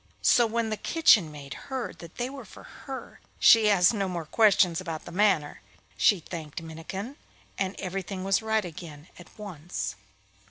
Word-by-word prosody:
So 240 -1 +5
when 225 0 -1
the 215 - -1
kitchen 210 - +4
maid 140 -2 -9 0.2
heard 265 -2 -4
that 170 -1 -12
they 245 0 -2
were 275 +1 -8
for - - -14
her, 270 -2 -9 0.2
she 220 -2 +6
asked 180 0 +5
no 200 -3 -1
more 170 -3 -4
questions 185 -2 +3
about 165 -4 -6
the - - -9
matter. 180 -6 +1 0.3
She 205 -5 +4
thanked 160 -1 -7
Minnikin, 170 - -7 0.4
and 190 0 -1
everything 190 0 -5
was 195 +1 +2
right 220 -2 0
again 160 -2 -10
at 175 - -12
once. 160 - -5
190 Hz, 165 wpm, -27 LUFS, 165-220 Hz, 0.4 s, she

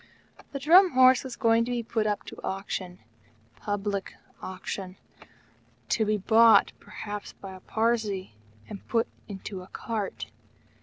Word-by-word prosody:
The 280 - -4
Drum 350 +7 +6
Horse 255 0 +6
was 260 -3 -7
going 230 -2 +3
to - - -6
be 240 -1 -1
put 220 -1 -1
up 205 -1 -1
to - - -10
auction 190 -2 -4 0.6
public 205 -1 -3 0.3
auction 185 0 -6 0.9
to 220 - +2
be 215 0 +1
bought, 225 +3 +5
perhaps, 210 0 -7
by 195 -1 -10
a 185 - -11
Parsee 220 - -1 0.4
and 200 - -10
put 230 -1 +1 0.2
into 195 -1 -7
a 180 - -12
cart! 215 -1 -5
215 Hz, 140 wpm, -27 LUFS, 195-230 Hz, 0.9 s, Drum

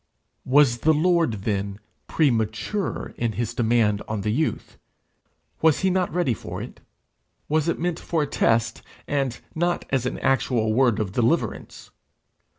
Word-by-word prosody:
Was 130 -3 +4
the 160 +4 +3
Lord 170 -4 +2
then 100 -1 -2 0.3
premature 120 - -1
in 115 -2 0
his 120 0 -3
demand 110 -3 +2
on 110 -2 -3
the 105 +2 -1
youth? 150 +7 -2 0.8
Was 160 -2 +3
he 190 -1 +2
not 185 -1 0
ready 175 -8 +1
for 100 - -7
it? - - -8 0.7
Was 155 +1 +1
it 170 - 0
meant 175 0 -2
for 160 -3 -1
a - - 0
test, 115 -4 +1 0.3
and 135 -4 -1
not 175 +2 -1
as 130 -2 +1
an - - -3
actual 120 -4 +1
word 120 -2 +3
of 105 -3 -2
deliverance? 120 - -1
125 Hz, 150 wpm, -24 LUFS, 110-160 Hz, 0.8 s, Was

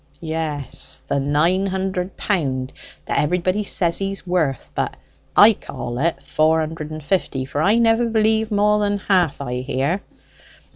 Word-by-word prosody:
"Yes; 155 -4 -1
the 140 - 0
nine 160 +8 +2
hundred 190 -1 -3
pound 135 -9 -1 0.3
that - - 0
everybody 180 +6 +1
says 170 -4 0
he's 195 -1 -4
worth; 160 -8 -1
but - - -2 0.4
I - - +9
call 120 +1 -6
it 165 +3 0
four 160 +1 +2
hundred 155 -1 -4
and 155 -1 -7
fifty; 145 -6 -1
for 145 +2 -3
I 205 +7 +4
never 230 0 +3
believe 220 0 +2
more 210 0 +3
than 205 -1 +1
half 185 -5 +1
I 125 -2 -3
hear." 135 +8 -1
170 Hz, 150 wpm, -21 LUFS, 145-195 Hz, 0.4 s, I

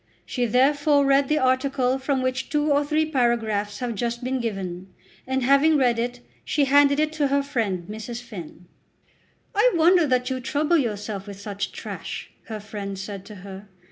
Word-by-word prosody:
She 245 -2 -1
therefore 285 +4 +3
read 275 0 +4
the 305 - +3
article 260 -1 +1
from 265 -1 0
which 255 -1 -2
two 295 0 +1
or 285 +1 +3
three 305 +2 +1
paragraphs 225 -7 0
have 245 0 -3
just 235 +3 -3
been 260 +1 -1
given, 190 -4 -4 0.4
and 265 0 0
having 280 +4 +5
read 245 -4 +2
it 240 +1 -3 0.2
she 285 -1 +1
handed 285 +1 +5
it 310 0 +1
to 300 -2 +1
her 280 +1 +1
friend 220 -11 -2
Mrs. 220 +3 -6
Finn. 180 -7 -10 0.9
"I 445 +4 +4
wonder 340 0 +5
that 250 -1 +1
you 260 - -1
trouble 300 +6 +1
yourself 210 -4 -3
with 200 -1 -8
such 200 0 -4
trash," - - -7 0.2
her 220 -2 -5
friend 200 -1 -6
said 195 0 -6
to 210 - -10
her. 195 +1 -9
250 Hz, 175 wpm, -24 LUFS, 210-285 Hz, 0.9 s, having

